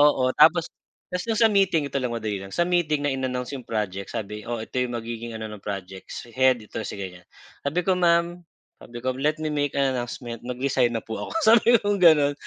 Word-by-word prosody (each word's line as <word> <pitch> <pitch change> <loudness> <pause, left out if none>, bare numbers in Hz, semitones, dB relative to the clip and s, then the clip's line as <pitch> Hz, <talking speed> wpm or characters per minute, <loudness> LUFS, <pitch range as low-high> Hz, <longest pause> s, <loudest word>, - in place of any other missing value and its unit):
oo, 130 -3 +4
tapos 165 +2 +6 0.5
tapos 180 - -2
nung 220 - 0
sa - - +7
meeting, 185 -7 +2
ito - - -1
lang, 125 - -1
madali 105 -3 -3
lang, 95 - -8
sa 175 - +2
meeting 155 -5 +1
na 145 - +1
in-announce 130 -1 -3
yung 130 - -10
project. 100 -3 -3
Sabi, 105 -1 -5
oh, 120 -1 -2
ito - - -10
yung 125 -1 -1
magiging 115 0 -6
ano 110 0 -5
ng 105 - -9
projects. 95 0 -7
Head, 130 -3 +3
ito 105 - -6
si - - -6
ganiyan. 90 -2 -7 0.4
Sabi 145 +5 0
ko, 185 -1 +2
"Ma'am," 170 0 +2 0.4
sabi 120 - -11
ko, 130 - +1
"Let 150 +4 +1
me - - 0
make 145 -1 -1
an 135 -1 +2
announcement, 120 -1 -5
nag-resign 125 -1 0
na 110 - -3
po 110 - -5
ako," - - -8 0.2
sabi 235 +1 +6
kong 205 -1 +1
gano'n. 150 -4 +6
130 Hz, 215 wpm, -25 LUFS, 115-155 Hz, 0.5 s, sa